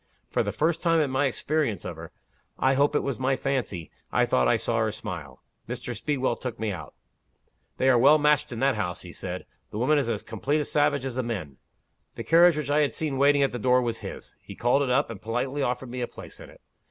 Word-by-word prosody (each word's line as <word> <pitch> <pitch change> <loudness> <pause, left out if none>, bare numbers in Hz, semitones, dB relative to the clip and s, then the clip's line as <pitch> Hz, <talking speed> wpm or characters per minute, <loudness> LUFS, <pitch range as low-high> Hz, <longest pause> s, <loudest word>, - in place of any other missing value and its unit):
For - - +2
the - - -1
first 165 +2 0
time 165 -2 +3
in 145 -4 +1
my 135 +2 +2
experience 135 - -1
of 90 - -5
her 80 0 -10 0.5
I 130 0 +3
hope 140 +2 +2
it - - +3
was 135 -5 -3
my 130 +1 +1
fancy 125 - -3 0.2
I - - +3
thought 65 -1 +2
I - - +4
saw - - 0
her - - +1
smile. - - -7 0.3
Mr. 120 - -4
Speedwell 130 0 -1
took 125 -3 -6
me 110 -1 -1
out. 80 -7 -8 0.8
'They 130 - +1
are 125 -2 +5
well 140 +5 +7
matched 150 -1 +2
in 115 - -5
that 135 0 +3
house,' 90 -6 -3
he 90 -1 -10
said. 90 0 -6 0.2
'The - - -7
woman 145 +6 +3
is 130 -4 -1
as 110 -3 -2
complete 145 +3 -1
a 150 - -1
savage 145 -2 +1
as 130 - -3
the - - +2
men.' 95 - -5 0.6
The - - -5
carriage 170 -1 +5
which 145 -2 -2
I 150 - +3
had 145 -6 +1
seen 145 -4 -2
waiting 140 0 +5
at 135 - +1
the 125 - -4
door 125 +2 +4
was 120 -2 -2
his. - - -8
He - - -11
called 120 +4 +2
it 140 - 0
up, 125 0 +2
and 105 - -9
politely 125 +6 -2
offered 125 -1 -2
me 125 0 -4
a 120 - -1
place - - -12
in - - -11
it. - - -18
130 Hz, 245 wpm, -26 LUFS, 115-145 Hz, 0.8 s, well